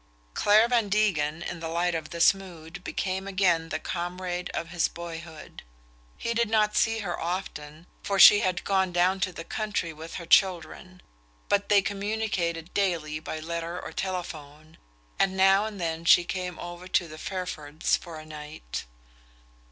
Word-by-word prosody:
Clare 215 +3 +5
Van 235 -4 +1
Degen, 170 -7 +1
in 175 - -5
the 165 - -4
light 170 +2 0
of 160 -2 -4
this 170 +2 +5
mood, 180 -2 -11
became 190 0 -3
again 180 -4 +2
the - - -1
comrade 180 0 -4
of 165 - -4
his 175 -1 +1
boyhood. 165 -2 -9 0.6
He 230 - -2
did 235 -1 +1
not 215 -1 +2
see 225 -1 +2
her 180 -4 -4
often, 165 -3 -5 0.2
for 200 - -1
she 205 +2 +10
had 185 -4 -1
gone 190 -2 +1
down 180 +2 +2
to 185 - 0
the 165 - -8
country 205 -5 -3
with 160 +2 -9
her 170 - -6
children, 185 0 +2 0.5
but 200 0 +1
they 200 -1 +5
communicated 195 -5 -2
daily 165 -6 0
by 155 0 -5
letter 170 +2 -4
or - - -7
telephone, 155 -5 -6 0.4
and 190 0 +2
now 195 +2 +5
and 210 -2 -8
then 165 -1 -2
she 175 - +7
came 180 0 -4
over 175 +1 -8
to 180 -1 +1
the 155 -1 -10
Fairfords' 160 -5 -2
for 170 -3 -8
a 155 - -10
night. 150 - -7
175 Hz, 165 wpm, -27 LUFS, 165-195 Hz, 0.6 s, she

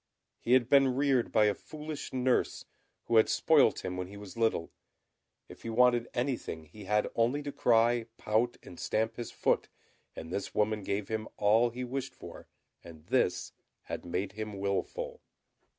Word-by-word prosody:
He 120 - +1
had 130 -2 +5
been 135 -1 +5
reared 135 -3 +2
by 110 -1 +4
a 105 - +3
foolish 155 +6 -7
nurse, 130 -1 0 0.4
who 115 - +2
had 110 - +5
spoilt - - +3
him 90 0 -3
when 90 0 -3
he 100 +2 -11
was 100 -2 -10
little. 115 -7 0 0.8
If - - -13
he 115 - -6
wanted 120 +1 +4
anything 120 - -2
he 100 +6 -12
had 105 +2 +2
only 125 +6 +1
to 145 - -4
cry, 120 -3 +3
pout, 115 +3 0
and 90 - -12
stamp 110 +1 -1
his 120 - -5
foot, - - 0 0.5
and 80 +1 -8
this 100 - -4
woman 105 0 +1
gave 100 +1 -2
him 110 0 -2
all 110 +4 +4
he 125 +2 -5
wished 135 +1 -4
for; - - -11 0.4
and 80 -2 -13
this 90 -9 +1 0.3
had - - -6
made 90 +3 -2
him 105 0 -6
wilful. 470 - -3
115 Hz, 170 wpm, -31 LUFS, 100-125 Hz, 0.8 s, had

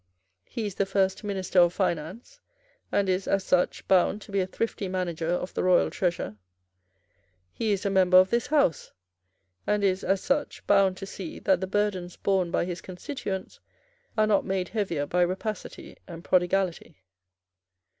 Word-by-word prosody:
He 230 - -4
is 205 - -3
the 195 +1 -1
first 195 0 0
minister 195 -2 0
of 175 0 +5
finance, 190 - -3 0.5
and 200 -1 +1
is, 185 +1 0
as 195 -1 +1
such, 180 -1 0
bound 190 +2 +3
to - - -13
be 200 - +1
a 185 - -2
thrifty 205 0 -3
manager 175 -3 -2
of 180 +1 -2
the - - -1
royal 180 -1 +4
treasure. 170 - -2 1.2
He 220 -2 -1
is 200 0 -1
a 200 - +1
member 185 -1 +5
of 185 0 +6
this 235 0 +1
House, 285 - +1 0.7
and 210 0 +1
is, 190 -1 +1
as 195 0 +1
such, 280 +1 -1
bound 195 -2 +3
to 195 - -6
see 190 -3 -7
that 190 -2 +2
the 190 - -2
burdens 190 -3 -1
borne 190 -3 +1
by 170 - 0
his 175 -1 -5
constituents 190 - -6 0.6
are 215 - +4
not 210 -2 +2
made 190 -2 -2
heavier 185 -9 -1
by 180 +5 0
rapacity 185 +4 -3
and 170 -1 -9
prodigality. 185 - 0
190 Hz, 165 wpm, -27 LUFS, 180-200 Hz, 1.2 s, of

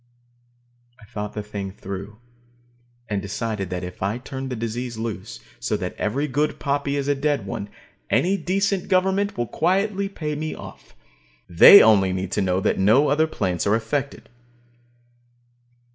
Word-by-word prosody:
I - - -17
thought 105 -1 -6
the 105 - -4
thing 100 -2 -5
through, 100 +2 -8 0.9
and 105 -2 -2
decided 105 -1 -4
that 90 0 -4
if 90 0 -8
I 100 +4 -1
turned 135 +1 -6
the 125 - -3
disease 115 +1 -4
loose, 110 -4 -5 0.2
so 105 - -1
that 90 -3 -4
every 135 +8 -1
good 145 +3 -1
poppy 140 0 -1
is 140 -1 -2
a 145 - +3
dead 140 -5 -1
one, 100 +1 -5 0.4
any 190 +3 +2
decent 195 0 -1
government 190 +2 +1
will 120 - 0
quietly 195 - 0
pay 155 -6 -4
me 155 +1 -4
off. - - -12 0.5
They 90 - +9
only 95 -4 +4
need 95 0 -3
to 105 - 0
know 95 -1 +1
that - - 0
no 115 +10 +4
other 155 +3 +2
plants 90 - -2
are 105 - +4
affected. 135 +5 -3
115 Hz, 160 wpm, -23 LUFS, 100-150 Hz, 0.9 s, They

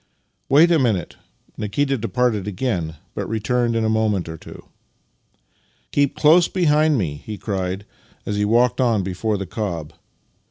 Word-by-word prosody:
" - - -46
" - - -48
Wait 155 +5 +6
a 165 - +4
minute." 110 - 0 0.4
Nikita 135 +7 0
departed 115 -3 0
again, 90 -6 -2 0.2
but - - -4
returned 115 +2 0
in 115 -1 +1
a - - +2
moment 110 -5 +1
or 80 - -6
two. - - -12 0.7
" - - -41
Keep 140 -1 +1
close 165 +3 +5
behind 155 -4 +2
me," 75 -9 -3
he 105 -1 -6
cried 95 -1 -3 0.4
as 105 - -2
he 105 - +1
walked 120 +4 +2
on 115 -6 +2
before 100 +3 -2
the 100 - -4
cob. 85 -6 -4
110 Hz, 165 wpm, -21 LUFS, 95-125 Hz, 0.7 s, Wait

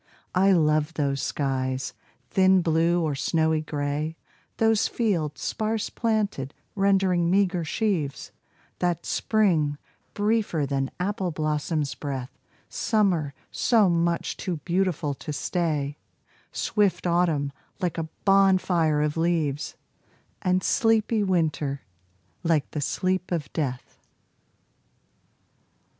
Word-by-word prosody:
I 195 +2 +4
love 155 -2 +2
those 140 -2 0
skies, 130 -2 -2 0.4
thin 190 -1 +4
blue 165 +1 +2
or 155 -2 0
snowy 160 +2 +1
gray, 150 +1 -3 0.4
Those 225 -1 +3
fields 165 - -1
sparse 220 -1 -1
planted, 210 - -1 0.2
rendering 190 -3 +2
meager 185 -2 +2
sheaves; 160 -5 -2 0.5
That 175 -2 0
spring, 165 -10 +1 0.4
briefer 205 -7 +1
than 135 -1 -1
apple 190 0 -1
blossom's 155 -1 -1
breath, 135 -3 -5 0.4
Summer, 180 - +1 0.2
so 220 -6 +3
much 170 0 0
too 180 -4 -3
beautiful 175 -5 0
to 145 - -7
stay, 150 -2 -1 0.5
Swift 205 -4 0
autumn, 170 -5 +1 0.3
like 175 -4 -1
a 160 -1 -4 0.2
bonfire 185 -6 +4
of 150 +1 -1
leaves, 160 -4 0 0.7
And 185 0 +1
sleepy 225 -1 +2
winter, 155 -7 0 0.6
like 165 -4 +1
the 150 - -3
sleep 185 +5 -1
of 155 -5 -3
death. 130 -6 -4
170 Hz, 105 wpm, -26 LUFS, 150-190 Hz, 0.7 s, I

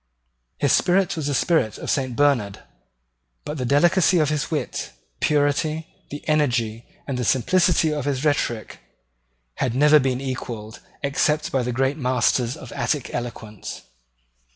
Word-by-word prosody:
His - - +1
spirit 180 +1 +2
was 155 -3 -3
the 145 - 0
spirit 130 - +1
of - - -3
Saint 130 -3 -1
Bernard: 125 -9 +1 0.8
but 150 0 -5
the 125 - -1
delicacy 175 +6 +4
of 155 -3 +2
his 150 -2 -1
wit, - - -3 0.3
the - - +1
purity, 150 +2 0 0.2
the 145 - -8
energy, 120 -7 0 0.2
the 125 -3 -2
simplicity 160 - +2
of 145 -3 -3
his 140 0 -1
rhetoric, 120 -7 -1 0.8
had 120 -2 -1
never 150 +2 +6
been 130 -2 0
equalled, 120 -5 -6 0.2
except 150 +2 +1
by 135 - +1
the 125 0 -2
great 135 +4 0
masters 125 0 +1
of 130 - -10
Attic 145 -5 -2
eloquence. 115 -4 -6
140 Hz, 145 wpm, -23 LUFS, 125-150 Hz, 0.8 s, never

